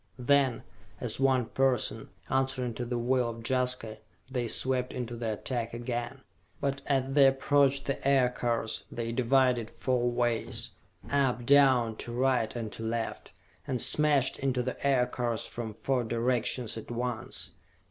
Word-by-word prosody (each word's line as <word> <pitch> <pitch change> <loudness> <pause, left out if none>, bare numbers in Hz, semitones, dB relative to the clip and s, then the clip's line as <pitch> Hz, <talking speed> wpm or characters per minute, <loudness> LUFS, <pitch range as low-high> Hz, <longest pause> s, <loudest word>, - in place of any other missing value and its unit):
Then, 130 -1 +2 0.4
as 120 -2 -1
one 130 -2 +3
person, 130 +1 0 0.2
answering 130 -2 0
to 120 - -4
the 120 0 -2
will 125 0 +1
of 115 0 -8
Jaska, 125 -4 0 0.3
they 125 -2 -1
swept 125 +2 0
in 125 - -3
to 120 +1 -7
the 115 -2 -2
attack 115 +1 -4
again. 120 +2 -4 0.4
But 140 0 -2
as 135 -1 0
they 140 -1 +7
approached 140 0 +2
the 140 0 -2
Aircars, 125 -6 +1
they 115 -1 -3
divided 125 -1 +2
four 125 -2 0
ways 120 -1 -1 0.4
up, 135 -4 +1
down, 130 -5 +4
to 120 - -6
right 125 -2 +1
and 115 -3 -4
to - - -7
left, 115 0 -3 0.4
and 130 -3 -1
smashed 145 -2 +3
into 130 -2 0
the 130 - -5
Aircars 125 -4 0
from 115 -2 -5
four 125 +3 -1
directions 120 0 0
at - - -12
once. 120 -1 -4
125 Hz, 145 wpm, -29 LUFS, 120-135 Hz, 0.4 s, they